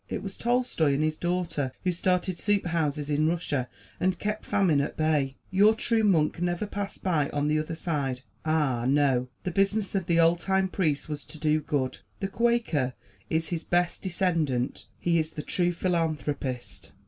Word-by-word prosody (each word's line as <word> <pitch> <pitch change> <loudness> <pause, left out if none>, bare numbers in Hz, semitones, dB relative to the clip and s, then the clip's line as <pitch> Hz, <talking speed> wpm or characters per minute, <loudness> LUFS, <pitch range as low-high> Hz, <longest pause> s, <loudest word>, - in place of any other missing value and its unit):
It - - -3
was 195 -1 -6
Tolstoy 240 - +1
and 150 - +1
his 155 0 -1
daughter 175 -6 -1
who 185 - +2
started 180 0 0
soup 205 -2 +1
houses 150 -3 -1
in 150 +2 +2
Russia 150 -7 -1 0.3
and 185 0 +1
kept 210 +1 -3
famine 170 -8 +3
at 140 - -4
bay. 150 -4 +1 0.2
Your 205 +4 +5
true 225 0 +1
monk 170 -4 +2
never 175 +3 0
passed 200 -1 -5
by 155 -7 +1
on 145 0 -1
the 155 0 +2
other 155 +2 -3
side; 140 -7 -2 0.2
ah, 150 -7 +1
no! 135 -3 +3 0.2
the 180 - -2
business 195 +2 +1
of 190 -4 -1
the 170 -1 +3
old 165 +1 +5
time 190 +1 +1
priest 155 -7 0
was 150 -2 -5
to 160 - -9
do 155 0 +2
good. 145 -4 -1 0.2
The 195 - -2
Quaker 230 - +1 0.4
is 160 0 0
his 165 -2 -3
best 175 0 +1
descendant 165 -9 -1
he 170 -1 +2
is 155 0 -2
the 150 - -5
true 175 +3 +1
philanthropist. 155 -7 -2
165 Hz, 180 wpm, -27 LUFS, 150-185 Hz, 0.4 s, Your